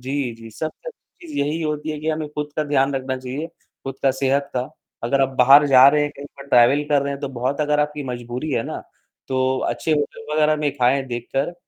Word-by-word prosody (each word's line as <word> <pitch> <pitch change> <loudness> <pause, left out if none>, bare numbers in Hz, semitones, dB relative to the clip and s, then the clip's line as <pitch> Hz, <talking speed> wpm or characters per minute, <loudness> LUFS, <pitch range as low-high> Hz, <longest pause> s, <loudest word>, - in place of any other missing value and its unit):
जी, 130 -1 -3
जी, 115 0 -12
सबसे 160 - -6
अच्छी 365 -6 -15
चीज 300 - -7
यही 150 +3 -1
होती 150 0 -3
है 150 - -4
कि 155 - -3
हमें 155 -1 -3
खुद 150 0 -4
का 155 - 0
ध्यान 140 -1 +1
रखना 130 0 -2
चाहिए, 130 +5 -5 0.4
खुद 135 0 -6
का 135 - +4
सेहत 135 +1 0
का, 125 0 -2 0.3
अगर 135 +4 +1
आप 135 - +3
बाहर 140 +4 +7
जा 130 -1 +8
रहे 150 +1 +3
हैं, 145 - -1
कहीं 140 +1 -8
पर 140 - -11
ट्रैवल 135 +3 +5
कर 145 -1 +3
रहे 140 0 -2
हैं 140 - -7
तो 140 - -3
बहुत 135 +4 -1
अगर 150 0 +2
आपकी 150 0 -2
मजबूरी 125 +3 -5
है 115 - +1
ना, - - -6 0.5
तो 130 0 +1
अच्छे 160 - -1
होटल 150 0 -2
वगैरह 155 0 +3
में 150 -1 0
खाएँ 130 +2 +2
देखकर 135 +7 -3
140 Hz, 230 wpm, -21 LUFS, 130-150 Hz, 0.5 s, जा